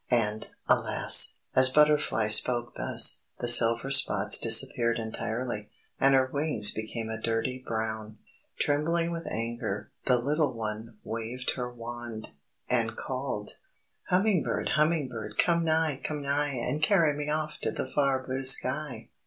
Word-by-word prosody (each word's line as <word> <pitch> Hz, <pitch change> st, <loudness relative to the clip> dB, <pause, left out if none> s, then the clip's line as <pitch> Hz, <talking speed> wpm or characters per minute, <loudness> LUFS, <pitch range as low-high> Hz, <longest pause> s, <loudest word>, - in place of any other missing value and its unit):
And, 110 Hz, -3 st, -1 dB, 0.2 s
alas! -, -, +4 dB, 0.2 s
as 130 Hz, 0 st, +6 dB
Butterfly 150 Hz, -6 st, +2 dB
spoke 120 Hz, +2 st, +3 dB
thus, -, -, +3 dB
the 120 Hz, -, -4 dB
silver 115 Hz, +2 st, +6 dB
spots 105 Hz, -7 st, +3 dB
disappeared 115 Hz, +1 st, +2 dB
entirely, 110 Hz, -1 st, -5 dB, 0.3 s
and 135 Hz, 0 st, +4 dB
her 130 Hz, -1 st, +3 dB
wings 135 Hz, -6 st, +3 dB
became 110 Hz, +1 st, -6 dB
a 110 Hz, 0 st, -6 dB
dirty 115 Hz, +3 st, -2 dB
brown. 110 Hz, -2 st, -5 dB, 0.4 s
Trembling 165 Hz, +4 st, 0 dB
with 170 Hz, 0 st, -6 dB
anger, 115 Hz, -3 st, -5 dB
the 125 Hz, -, +3 dB
little 150 Hz, +5 st, -1 dB
one 110 Hz, 0 st, -7 dB
waved 115 Hz, +3 st, -5 dB
her 125 Hz, -1 st, -5 dB
wand, 120 Hz, -2 st, -9 dB, 0.4 s
and 115 Hz, -3 st, -1 dB
called: 130 Hz, -6 st, -5 dB, 0.6 s
"_Hummingbird! 190 Hz, -1 st, 0 dB
Hummingbird! 130 Hz, -9 st, -2 dB
Come 170 Hz, -1 st, +1 dB
nigh! 160 Hz, -3 st, 0 dB
Come 150 Hz, -2 st, -5 dB
nigh! 140 Hz, 0 st, -1 dB
And 135 Hz, +5 st, -3 dB
carry 160 Hz, -3 st, +2 dB
me 150 Hz, 0 st, -5 dB
off 155 Hz, 0 st, -3 dB
To -, -, -2 dB
the -, -, -5 dB
far 135 Hz, -2 st, 0 dB
Blue 130 Hz, +1 st, -4 dB
Sky! 135 Hz, +2 st, +1 dB
125 Hz, 135 wpm, -27 LUFS, 115-145 Hz, 0.6 s, as